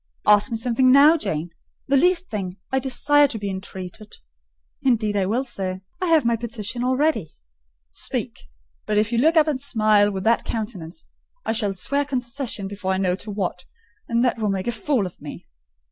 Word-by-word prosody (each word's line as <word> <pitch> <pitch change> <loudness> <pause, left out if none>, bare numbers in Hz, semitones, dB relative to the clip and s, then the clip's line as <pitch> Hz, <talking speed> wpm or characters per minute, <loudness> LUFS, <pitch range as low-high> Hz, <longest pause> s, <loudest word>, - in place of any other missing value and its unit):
"Ask 210 +4 +5
me 230 - -2
something 250 +2 +2
now, 285 +4 +7
Janet,—the 170 - -4
least 360 +5 +2
thing: 190 -3 -4
I 265 - +2
desire 290 +3 +3
to 240 - -5
be 200 -2 -4
entreated—" 190 +1 -8 0.7
"Indeed 220 -5 +1
I 195 -2 +1
will, 240 +6 0
sir; 190 -6 -4 0.2
I 365 - 0
have 320 -5 +4
my 235 0 +3
petition 230 0 -4
all 255 +1 +1
ready." 285 - +1 0.6
"Speak! 65 - -4 0.4
But 210 - 0
if 210 +1 +2
you 235 - +1
look 320 +6 +3
up 310 - +6
and 280 -4 -1
smile 215 -6 +3
with 190 -2 -4
that 230 +1 +2
countenance, 205 -7 -5 0.4
I - - 0
shall 210 -3 0
swear 280 +10 0
concession 250 -5 -4
before 195 -1 -3
I - - 0
know 185 -2 +1
to 210 - -9
what, 190 -3 -3 0.4
and 235 +1 +1
that 245 - 0
will 215 -2 0
make 190 -1 -2
a 240 - 0
fool 240 -1 0
of 180 - -9
me." - - -9
225 Hz, 190 wpm, -23 LUFS, 195-265 Hz, 0.7 s, now